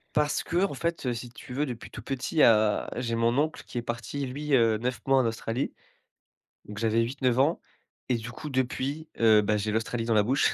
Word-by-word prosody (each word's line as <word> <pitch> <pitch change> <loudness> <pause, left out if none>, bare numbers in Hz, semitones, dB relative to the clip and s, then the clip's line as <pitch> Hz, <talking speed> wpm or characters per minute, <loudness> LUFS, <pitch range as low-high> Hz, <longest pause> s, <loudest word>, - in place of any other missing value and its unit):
Parce 150 0 +1
qu'en 180 0 0
fait, 165 -5 -2
si 120 +1 -6
tu 125 0 -11
veux, 145 +3 0
depuis 120 -4 -7
tout - - -8
petit, 135 +3 -1
à 110 -2 +4
j'ai 115 -2 -1
mon 115 +2 +2
oncle 155 +2 0
qui - - -7
est - - 0
parti 120 +4 -4
lui, 145 +3 -4
heu, 115 -3 +4
9 125 +2 -2
mois 135 0 +4
en 125 - +2
Australie. 115 +3 -2 0.9
Donc 105 0 -9
j'avais 115 +1 +2
8-9 125 0 0
ans 150 +6 +2 0.5
et 125 - +3
du 115 +2 -7
coup 150 - -7
depuis, 135 +4 -2
heu, 110 -2 +6
bah, 105 +1 +1
j'ai 105 +1 -1
l'Australie 115 +1 -1
dans 115 - +1
la 105 -1 +4
bouche. 130 +6 +2
125 Hz, 210 wpm, -27 LUFS, 115-140 Hz, 0.9 s, heu